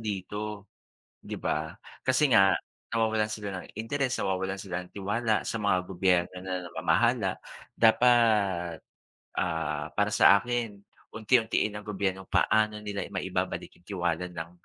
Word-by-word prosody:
dito." 105 0 -4 0.6
'Di - - -6
ba? 80 +1 -2 0.3
kasi 130 +3 +3
nga 95 -3 +6 0.3
nawawalan 110 -1 +1
sila 100 -3 -5
ng - - -12
interes, 130 +3 -1
nawawalan 95 +1 -1
sila 90 -2 -4
ng 90 - -15
tiwala 105 +3 -1
sa - - -2
mga 100 -3 +3
gobyerno 90 -1 +1
na 90 -1 -4
namamahala - - +1 0.4
dapat, 110 -8 +3 0.5
ah, 80 -3 -1
para - - +2
sa - - +6
akin, 115 -4 -3 0.3
unti-untiin 110 -1 +1
ng 105 0 -8
gobyernong 95 -2 -2
paano 110 -1 +2
nila 100 -1 -3
maibabalik - - -3
'yong 90 - -32
tiwala 90 -3 -1
ng, 85 -2 -7
100 Hz, 130 wpm, -28 LUFS, 90-110 Hz, 0.6 s, nga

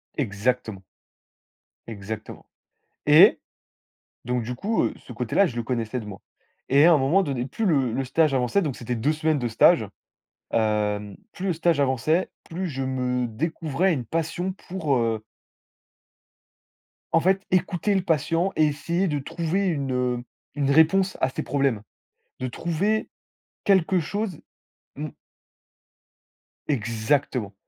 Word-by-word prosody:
Exactement. 110 -3 -1 1.0
Exactement 110 0 -7 0.6
et 155 +8 +7 0.8
donc 125 -1 -1
du 120 +3 -4
coup, 210 - 0
heu, - - 0
ce 125 - -11
côté-là, 125 - +2
je 125 - -8
le 120 - -2
connaissais 115 0 -2
de 110 - -8
moi 100 -1 -9 0.5
et 140 +3 +6
à 170 - +7
un - - +5
moment 150 +9 +3
donné, 135 -6 -2
plus 215 - -3
le 140 - +2
le 135 +2 -1
stage 155 +3 +2
avançait, 130 +9 +2
donc 150 -8 -2
c'était 120 0 -4
2 130 +7 +1
semaines 155 -1 0
de 120 - -1
stage. 115 0 +4 0.7
Hem, 105 -2 0 0.2
plus 190 - -5
le 185 - +2
stage 165 -2 +1
avançait, 140 +6 +1 0.2
plus 180 +3 -3
je 135 -3 -4
me 125 -1 -1
découvrais 160 - -1
une 130 -5 -4
passion 165 - -2
pour, 175 -6 -2
heu 115 -2 -1 1.9
en 165 - +5
fait, 190 +3 +2
écouter 185 +2 +1
le 190 - +2
patient 165 +3 +1
et 155 - +4
essayer 170 +6 -1
de 150 -3 -1
trouver 170 +7 -2
une, 140 -6 -1
heu, 125 -1 -1 0.3
une 140 -1 +1
réponse 175 +6 +4
à 130 - +3
ses - - -4
problèmes, 135 -7 0 0.6
de 130 - -2
trouver 175 - -1 0.6
quelque 190 -2 +3
chose, 195 +1 -3 0.6
mmh 150 +2 -4 1.6
Exactement 115 -2 -1
140 Hz, 140 wpm, -25 LUFS, 120-170 Hz, 1.9 s, et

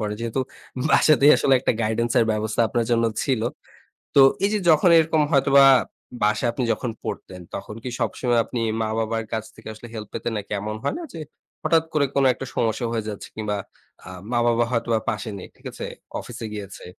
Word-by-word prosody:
পড়ে। 105 -1 -2
যেহেতু 115 +3 -2 0.5
বাসাতেই 150 -1 +6
আসলে 135 - +3
একটা - - +1
গাইডেন্স 115 +2 0
এর 115 - +4
ব্যবস্থা 110 +1 -1
আপনার 120 +1 0
জন্য 115 -1 +3 0.2
ছিল। 130 -5 0 0.8
তো 140 - +8 0.2
এই 200 - +4
যে 210 - +1
যখন 160 +2 +5
এরকম 160 -1 +3
হয়তোবা 140 -1 +6 0.6
বাসায় 105 +3 +2
আপনি 125 - -2
যখন 120 +2 -4
পড়তেন। 90 -1 -6
তখন 105 +2 -7
কি 125 - -4
সবসময় 120 +1 0
আপনি 120 - -4 0.2
মা-বাবার 115 +1 -1
কাছ 110 -1 -1
থেকে 110 - -13
আসলে 110 +2 -11
হেল্প 110 -2 -6
পেতেন? 115 +1 -3
নাকি 105 - -7
এমন 105 +2 -4
হয় 140 - -1
না 345 - -6
যে 165 - -7 0.4
হঠাৎ 160 0 +3
করে 150 -2 +3
কোন 140 - +3
একটা 135 - -7
সমস্যা 115 +1 0
হয়ে 115 -2 -1
যাচ্ছে 105 - -7
কিংবা 105 -1 -2 0.5
আ - - -8 0.2
মা-বাবা 120 0 +2
হয়তোবা 115 -2 +1
পাশে 110 +1 -3
নেই। - - -9
ঠিক - - -25
আছে? - - -6 0.3
অফিসে 115 - -8
গিয়েছে 100 -2 -8
115 Hz, 185 wpm, -23 LUFS, 110-135 Hz, 0.8 s, তো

